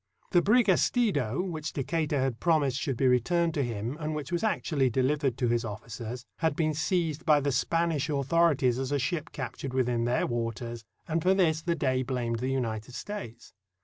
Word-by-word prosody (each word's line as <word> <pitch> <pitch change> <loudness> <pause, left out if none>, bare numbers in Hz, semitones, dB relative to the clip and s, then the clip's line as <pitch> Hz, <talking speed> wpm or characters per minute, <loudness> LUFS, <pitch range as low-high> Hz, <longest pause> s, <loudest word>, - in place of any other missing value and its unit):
The 175 - +5
brig 235 +5 +4
Estido, 180 - +2
which 160 -5 -4
Decatur 150 +1 -1
had 130 -3 -1
promised 150 -6 +2
should 135 -6 -2
be 135 - +1
returned 165 +7 +2
to 145 - 0
him, 120 +3 -3
and 155 0 -3
which 150 +2 -5
was 175 +2 -1
actually 150 - +1
delivered 135 +1 +1
to 125 - +1
his 120 0 +1
officers, 115 +2 -6
had 160 -3 0
been 155 -1 +1
seized 160 0 -1
by 150 -3 +5
the 140 0 0
Spanish 165 +2 0
authorities 140 -3 +2
as 135 +1 -3
a 145 - +2
ship 155 +4 -2
captured 135 0 -5
within 120 -2 +1
their 120 +1 +1
waters, 115 -1 -3 0.2
and 165 +1 0
for 185 +3 +3
this 160 -4 +2
the 170 +1 0
Dey 130 -5 +1
blamed 120 -3 -2
the 130 +2 -1
United 120 -3 -3
States. 200 - -7
140 Hz, 185 wpm, -28 LUFS, 125-165 Hz, 0.2 s, The